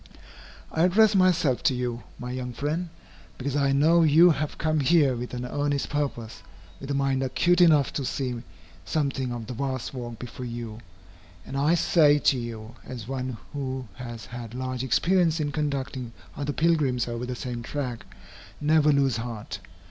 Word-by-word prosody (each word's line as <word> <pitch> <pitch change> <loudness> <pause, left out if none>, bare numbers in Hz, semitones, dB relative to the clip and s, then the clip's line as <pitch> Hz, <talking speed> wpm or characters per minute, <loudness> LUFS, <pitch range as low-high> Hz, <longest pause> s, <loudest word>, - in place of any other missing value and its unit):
I 160 - 0
address 205 +4 +5
myself 175 -9 +3
to 145 -7 +2
you, 120 -1 -3 0.2
my 125 0 -6
young 125 -1 -4
friend, 155 +7 -2 0.5
because 135 +1 -3
I 140 -1 +2
know 160 +5 +4
you 165 +3 +7
have 150 -1 -2
come 155 0 +1
here 145 -2 +4
with 120 +1 -5
an 125 0 -4
earnest 145 +2 -1
purpose, 130 - -3 0.4
with 135 - -8
a 140 - 0
mind 135 -1 +1
acute 175 +7 +2
enough 155 -6 +5
to 140 - -2
see 125 -2 -2 0.4
something 135 - -1
of 120 -2 -5
the 125 - -6
vast 130 0 -3
work 120 -3 -6
before 125 +1 -7
you, 115 -2 -6 0.7
and 135 - -7
I 145 +5 +3
say 150 -4 +4
to 140 -2 +3
you, 115 -1 -7
as 120 -4 -8
one 130 -2 -3 0.2
who 130 -3 -4
has 120 +1 -8
had 120 -1 -8
large 130 0 -3
experience 165 +5 +2
in 145 -1 -1
conducting 135 -4 -3 0.2
other 145 +1 -2
pilgrims 145 -7 +1
over 120 +1 -4
the 125 - -3
same 120 -1 -5
track, 125 -1 -4 0.6
never 150 0 +4
lose 135 -4 +2
heart. 115 -2 -6
135 Hz, 170 wpm, -26 LUFS, 125-150 Hz, 0.7 s, you